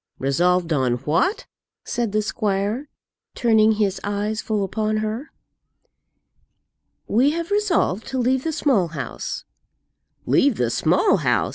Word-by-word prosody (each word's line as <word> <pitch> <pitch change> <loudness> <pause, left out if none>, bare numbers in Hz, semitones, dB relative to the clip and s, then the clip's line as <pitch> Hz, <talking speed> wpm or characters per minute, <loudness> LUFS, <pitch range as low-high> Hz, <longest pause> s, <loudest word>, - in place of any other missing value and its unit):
"Resolved 170 +5 +1
on 130 -4 +1
what?" 345 - +1 0.4
said 235 -3 -2
the 215 +1 +1
squire, 210 +6 -2 0.5
turning 220 -2 +4
his 200 -3 -1
eyes 205 +2 -2
full 215 -2 -1
upon 215 +2 -1
her. 215 +6 -3 1.8
"We 250 +7 +3
have 335 +2 -4
resolved 375 - +1
to 265 - -3
leave 255 +1 +1
the 325 - -1
Small 255 - +2
House." 165 - -6 0.8
"Leave 275 -5 +3
the 120 -1 0
Small - - +3
House!" - - +1
215 Hz, 125 wpm, -22 LUFS, 195-255 Hz, 1.8 s, turning